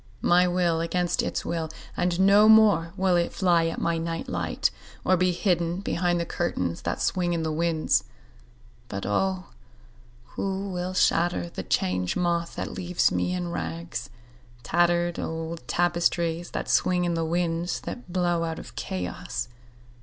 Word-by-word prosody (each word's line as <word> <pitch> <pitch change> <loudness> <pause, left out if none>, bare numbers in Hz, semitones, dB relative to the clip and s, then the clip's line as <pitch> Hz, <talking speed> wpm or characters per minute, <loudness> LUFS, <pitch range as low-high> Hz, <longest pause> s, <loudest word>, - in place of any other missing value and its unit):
My 180 +1 +5
will 175 -2 +1
against 175 +1 0
its - - -3
will, 165 -2 -2 0.3
and 180 0 0
no 200 +3 +6
more 205 -7 +6
will 190 -1 +3
it 170 0 +1
fly 170 -3 +2
at 165 - -3
my 170 -1 0
night 165 0 -3
light - - -1 0.3
or 185 - +4
be 185 0 +2
hidden 175 -1 0
behind 175 -2 0
the 170 - -1
curtains 90 - -2
that - - -2
swing 175 -2 +1
in 165 -1 -1
the 160 - -1
winds.(But 100 - -3
O 185 - 0 0.9
who 195 0 -3
will 180 +1 -3
shatter 165 - +2
the - - -5
Change 90 -1 0
Moth 170 -1 0
that - - -4
leaves 180 0 +1
me 180 - 0
in 175 -1 -3
rags—tattered 165 +3 -2
old 160 -3 -5
tapestries 175 -1 +1
that - - -4
swing 180 -1 +2
in 175 - 0
the 165 -1 0
winds 170 +1 -1
that 245 -7 -7
blow 175 -2 +1
out 165 -1 -3
of - - -10
Chaos!) 90 +6 -4
170 Hz, 150 wpm, -26 LUFS, 165-180 Hz, 0.9 s, no